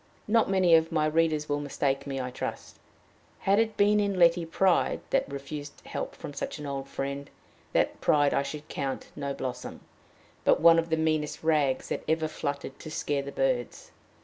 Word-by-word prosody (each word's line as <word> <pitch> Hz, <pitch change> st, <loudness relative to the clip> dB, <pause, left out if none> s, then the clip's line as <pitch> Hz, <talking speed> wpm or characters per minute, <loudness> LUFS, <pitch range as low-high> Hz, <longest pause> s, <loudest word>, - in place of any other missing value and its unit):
Not 225 Hz, 0 st, +3 dB
many 185 Hz, -3 st, +4 dB
of 160 Hz, 0 st, +5 dB
my 155 Hz, -2 st, +2 dB
readers 155 Hz, -1 st, +1 dB
will 145 Hz, 0 st, 0 dB
mistake 140 Hz, -1 st, -1 dB
me, 135 Hz, -1 st, -3 dB
I 125 Hz, -1 st, -3 dB
trust. -, -, -6 dB, 0.6 s
Had 200 Hz, +2 st, +2 dB
it 220 Hz, -1 st, 0 dB
been 210 Hz, +1 st, +4 dB
in 200 Hz, -2 st, 0 dB
Letty 170 Hz, -1 st, +4 dB
pride 185 Hz, +2 st, +2 dB
that -, -, +1 dB
refused 145 Hz, +1 st, -7 dB
help -, -, -5 dB
from -, -, -8 dB
such -, -, -4 dB
an 150 Hz, -, -7 dB
old 140 Hz, -1 st, -4 dB
friend, 140 Hz, +1 st, -4 dB, 0.4 s
that -, -, +1 dB
pride 145 Hz, -1 st, +3 dB
I -, -, +2 dB
should 150 Hz, +2 st, -6 dB
count 135 Hz, -4 st, -4 dB
no 140 Hz, 0 st, -3 dB
blossom, 130 Hz, -2 st, -5 dB, 0.6 s
but -, -, +4 dB
one 165 Hz, +1 st, +7 dB
of 165 Hz, 0 st, -2 dB
the 160 Hz, -, +1 dB
meanest 155 Hz, -1 st, -1 dB
rags 150 Hz, -5 st, +1 dB
that -, -, -3 dB
ever 160 Hz, 0 st, +1 dB
fluttered 140 Hz, -3 st, -5 dB
to -, -, -8 dB
scare 145 Hz, -2 st, -1 dB
the 140 Hz, 0 st, -7 dB
birds. 130 Hz, -3 st, -1 dB
150 Hz, 185 wpm, -28 LUFS, 140-165 Hz, 0.6 s, one